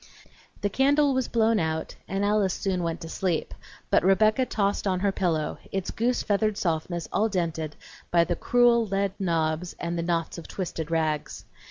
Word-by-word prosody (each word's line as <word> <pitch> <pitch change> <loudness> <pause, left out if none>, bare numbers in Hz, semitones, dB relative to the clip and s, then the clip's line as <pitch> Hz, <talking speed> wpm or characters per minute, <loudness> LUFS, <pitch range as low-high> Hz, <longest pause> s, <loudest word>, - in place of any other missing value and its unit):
The 205 - +1
candle 280 +4 +3
was 260 -2 0
blown 225 -1 +2
out 160 -1 -2
and 195 +1 -1
Alice 205 -3 +2
soon 190 -2 -1
went 165 -1 -3
to 165 - -6
sleep, 170 0 -2 0.4
but - - +4
Rebecca 215 +7 +4
tossed 200 -1 0
on 185 -1 0
her 200 0 +2
pillow, 165 -6 -1
its 195 -1 -2
goose 240 +2 0
feathered 210 0 +1
softness 170 0 -2
all 220 +2 +2
dented 165 -5 -2 0.3
by 170 -1 +4
the 175 +1 -1
cruel 240 +3 +4
lead 195 0 0
knobs 165 -1 0
and 170 0 -2
the - - -1
knots 170 0 -1
of 165 - -10
twisted 165 -4 -4
rags. 155 -2 -1
185 Hz, 175 wpm, -26 LUFS, 165-210 Hz, 0.4 s, but